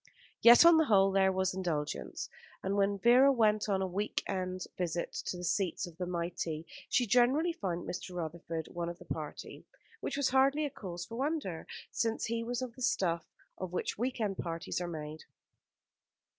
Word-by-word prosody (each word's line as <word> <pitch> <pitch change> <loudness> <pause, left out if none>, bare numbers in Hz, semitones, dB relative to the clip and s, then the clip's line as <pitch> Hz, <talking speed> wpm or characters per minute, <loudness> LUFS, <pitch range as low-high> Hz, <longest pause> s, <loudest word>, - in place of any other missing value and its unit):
Yet 240 +7 +9
on 340 -1 +8
the 320 - +4
whole 195 -5 +5
there 190 0 +4
was 190 0 0
indulgence; 170 -6 -3 0.4
and 195 +1 0
when 200 0 +2
Vera 250 +6 +6
went 215 -4 +2
on 190 -1 +1
a - - -1
week 200 +4 -2
end 185 -1 -3
visit 175 -1 -2
to 180 - -2
the 175 - -7
seats 180 +1 0
of 170 -2 -12
the 180 - -2
mighty 170 -2 -3 0.2
she 245 - +3
generally 255 - +3
found 180 - -3
Mr. 180 0 -5
Rutherford 165 -1 -4
one 170 -1 -3
of 170 - -7
the - - -14
party; - - -6 0.4
which - - -3
was 285 -2 +2
hardly 275 +3 +3
a 285 - -3
cause 180 -8 -6
for 230 - -8
wonder, 270 - -2 0.2
since 225 -1 -1
he 230 0 -2
was 245 +2 -2
of 245 -2 -6
the 255 - -12
stuff 170 -8 0 0.3
of 185 -1 -5
which 180 - -2
week 250 +1 -1
end 205 -3 -1
parties 165 +1 -3
are 175 - -2
made. 155 -2 -7
190 Hz, 185 wpm, -32 LUFS, 175-240 Hz, 0.4 s, Yet